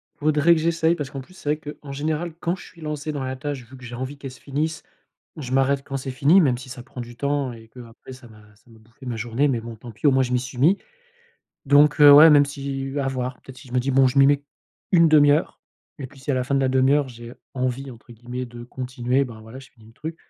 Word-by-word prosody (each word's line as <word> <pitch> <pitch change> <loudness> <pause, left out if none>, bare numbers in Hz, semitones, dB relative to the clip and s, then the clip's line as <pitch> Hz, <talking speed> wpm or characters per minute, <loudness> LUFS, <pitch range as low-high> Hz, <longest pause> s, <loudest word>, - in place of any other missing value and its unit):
Faudrait 155 +2 +3
que 160 - -1
j'essaye, 165 0 +1
parce 145 -5 -5
qu'en 135 - -6
plus 130 - -17
c'est 150 -4 -1
vrai 150 0 -7
qu'en 140 - -9
général, 155 +4 -3
quand 170 +1 -1
je - - -13
suis 170 - -17
lancé 150 0 -4
dans 145 -3 -4
la 130 0 -4
tâche, 140 -1 -5
vu 130 +3 -14
que 130 - -12
j'ai 120 - -9
envie 130 +3 -6
qu'elle 135 -1 -8
se 130 - -15
finisse, 150 +3 -3 0.6
je 130 -5 -7
m'arrête 135 +1 +2
quand 135 0 -5
c'est 135 0 -6
fini 145 +9 +4
même 130 -6 +2
si 130 +1 -11
ça 125 -1 -8
prend 125 - -12
du 120 0 -10
temps 140 -1 -1
et 115 -1 -14
qu'après 120 +1 -12
ça 125 -1 -14
m'a 110 -2 -17
ça 105 - -29
m'a 110 - -18
bouffé 115 +4 -18
ma 120 -2 -3
journée 120 +5 0
mais 130 -4 0
bon, 115 0 -8
tant 115 +2 -11
pis, 115 +7 -1
au - - +6
moins 130 0 +3
je 125 - -4
m'y 125 - +2
suis 130 +1 -8
mis. 165 +10 +4 0.9
Donc, 145 +1 +4
heu, 145 -1 +10
ouais, 150 +3 +10
même 145 -1 +6
si 140 -1 -5
heu, 140 +1 -3
à - - -2
voir, 130 -1 -3
peut-être 130 - -13
si 130 - -14
je - - -13
me 125 - +2
dis: 135 +2 -2
«Bon, 135 0 +5
je 130 - 0
m'y 135 - +7
mets 145 0 +2 0.5
1/2 155 -4 +6
heure», 150 +3 -1 0.4
et 135 - -6
puis, 140 +1 -18
si 135 - -17
à - - +1
la 130 - 0
fin 140 - -1
de - - +2
la 135 - +2
1/2 130 +1 +3
heure 145 -1 +2
j'ai 120 -1 -11 0.2
«envie» 130 +1 -2
entre 120 +1 -15
guillemets 120 +2 -6
de 120 0 -10
continuer, 125 +1 -2
ben 115 -4 -10
voilà, 115 +4 -11
je 135 - -16
finis 110 -4 -21
le 110 - -17
truc. 160 +7 -7
135 Hz, 280 wpm, -23 LUFS, 125-145 Hz, 0.9 s, heu